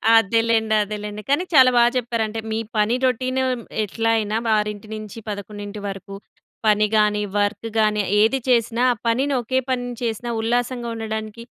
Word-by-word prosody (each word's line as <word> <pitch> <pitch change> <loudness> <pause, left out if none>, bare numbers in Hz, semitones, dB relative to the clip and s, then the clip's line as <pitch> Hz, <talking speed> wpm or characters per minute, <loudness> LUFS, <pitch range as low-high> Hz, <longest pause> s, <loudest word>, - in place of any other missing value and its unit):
అదేలెండి, 225 0 +3
అదేలెండి. 210 0 -6
కాని 285 +5 +2
చాల 260 -3 +8
బా 240 - +7
చెప్పారంటే, 225 -2 -2
మీ 220 - -1 0.2
పని 210 +3 +2
రొటీను 255 +1 0 0.4
ఎట్లా 225 +3 -1
అయినా, 215 0 -1 0.2
ఆరింటి 210 0 -3
నుంచి 215 0 -8
పదకొండింటి 205 0 -6
వరకు. 195 0 -7 0.5
పని 210 0 +4
గాని, 210 -1 +2 0.2
వర్క్ 205 +2 -1
గాని, 210 -1 +2 0.2
ఏది 225 +5 +3
చేసిన, 235 -1 +2
ఆ - - 0
పనిని, 265 +5 +1
ఒకే 260 +3 0
పనిని 245 -1 -2
చేసిన 230 +1 -3
ఉల్లాసంగా 240 +1 -1
ఉండడానికి 220 0 -5
220 Hz, 145 wpm, -22 LUFS, 210-240 Hz, 0.5 s, చాల